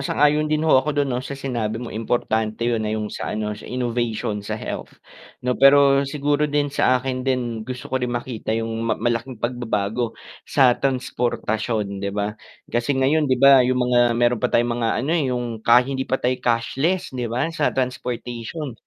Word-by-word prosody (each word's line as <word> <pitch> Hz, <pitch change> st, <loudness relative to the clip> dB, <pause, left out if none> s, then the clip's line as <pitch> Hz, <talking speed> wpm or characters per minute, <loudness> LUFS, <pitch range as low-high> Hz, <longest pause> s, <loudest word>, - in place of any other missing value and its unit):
sang-ayon 150 Hz, +2 st, +2 dB
din 155 Hz, +1 st, 0 dB
ho 145 Hz, -5 st, +5 dB
ako 150 Hz, +2 st, -3 dB
dun, 140 Hz, -2 st, +1 dB
'no, 125 Hz, -, -1 dB
sa 140 Hz, +1 st, -6 dB
sinabi 120 Hz, -5 st, -3 dB
mong 120 Hz, 0 st, -6 dB
importante 110 Hz, 0 st, -1 dB
yun 120 Hz, -2 st, +1 dB
na 110 Hz, -, -2 dB
yung 105 Hz, -1 st, -4 dB
sa -, -, -4 dB
ano, 105 Hz, -1 st, -2 dB
sa 105 Hz, -, -10 dB
innovation, 120 Hz, -4 st, -2 dB
sa 105 Hz, +1 st, -4 dB
health, -, -, -6 dB, 0.5 s
'no, 125 Hz, -, +2 dB
pero 140 Hz, 0 st, +6 dB
siguro 145 Hz, +1 st, 0 dB
din 145 Hz, -1 st, 0 dB
sa 130 Hz, -2 st, +3 dB
akin 130 Hz, 0 st, -3 dB
din, 125 Hz, -3 st, -1 dB
gusto 125 Hz, 0 st, -7 dB
ko 130 Hz, -, +1 dB
din 125 Hz, -, -1 dB
makita 120 Hz, -2 st, -3 dB
yung 115 Hz, 0 st, -3 dB
ma 115 Hz, 0 st, 0 dB
malaking 120 Hz, +2 st, -2 dB
pagbabago 115 Hz, -1 st, -2 dB, 0.3 s
sa 130 Hz, -4 st, +5 dB
transportasyon, 115 Hz, -5 st, -2 dB
'di 100 Hz, -, -2 dB
ba. 105 Hz, 0 st, -1 dB, 0.3 s
Kasi 120 Hz, +4 st, -1 dB
ngayon, 145 Hz, +3 st, +2 dB
'di 130 Hz, -, +3 dB
ba, 135 Hz, +1 st, +7 dB
yung 125 Hz, 0 st, +2 dB
mga 120 Hz, -1 st, +4 dB
meron 120 Hz, -1 st, +2 dB
pa -, -, +1 dB
tayong 120 Hz, 0 st, +2 dB
mga 115 Hz, -, +1 dB, 0.2 s
ano 145 Hz, -, -1 dB
eh, 165 Hz, -4 st, +2 dB
yung 120 Hz, -3 st, -3 dB
ka 120 Hz, +2 st, +5 dB
hindi 135 Hz, 0 st, -3 dB
pa 130 Hz, -, +2 dB
tayong 125 Hz, 0 st, -1 dB
cashless, 135 Hz, +10 st, 0 dB
'di 125 Hz, -2 st, -3 dB
ba, 120 Hz, +3 st, -1 dB
sa 155 Hz, -3 st, +1 dB
transportation. 125 Hz, +2 st, -4 dB
125 Hz, 190 wpm, -22 LUFS, 115-135 Hz, 0.5 s, ba